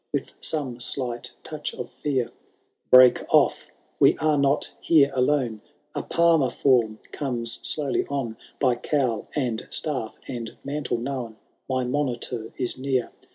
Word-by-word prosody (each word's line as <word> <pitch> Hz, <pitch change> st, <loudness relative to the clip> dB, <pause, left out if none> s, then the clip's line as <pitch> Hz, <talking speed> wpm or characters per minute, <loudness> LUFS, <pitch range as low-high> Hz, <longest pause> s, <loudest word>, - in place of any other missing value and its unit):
With -, -, -2 dB
some 135 Hz, -6 st, -2 dB
slight 120 Hz, -1 st, -1 dB
touch -, -, -5 dB
of -, -, -7 dB
fear^— 135 Hz, -5 st, -1 dB
^ -, -, -25 dB, 0.6 s
Break 125 Hz, -1 st, +8 dB
off, -, -, +3 dB, 0.3 s
we -, -, +5 dB
are 155 Hz, -1 st, +2 dB
not 140 Hz, 0 st, +1 dB
here 145 Hz, -4 st, +4 dB
alone; 125 Hz, -4 st, +1 dB, 0.3 s
A -, -, -2 dB
Palmer 165 Hz, -5 st, +3 dB
form 120 Hz, -6 st, +2 dB
comes 120 Hz, -5 st, 0 dB
slowly 145 Hz, -3 st, 0 dB
on! 135 Hz, -6 st, -3 dB, 0.2 s
By 125 Hz, -3 st, +2 dB
cowl, 125 Hz, -5 st, -1 dB
and 125 Hz, -6 st, -1 dB
staff, 130 Hz, -8 st, -1 dB
and 120 Hz, -3 st, -6 dB
mantle 140 Hz, -3 st, -2 dB
known. 120 Hz, -2 st, -4 dB, 0.3 s
My 130 Hz, -1 st, 0 dB
monitor 125 Hz, -4 st, -2 dB
is 125 Hz, 0 st, 0 dB
near. 130 Hz, -2 st, -1 dB
130 Hz, 140 wpm, -25 LUFS, 120-140 Hz, 0.6 s, Break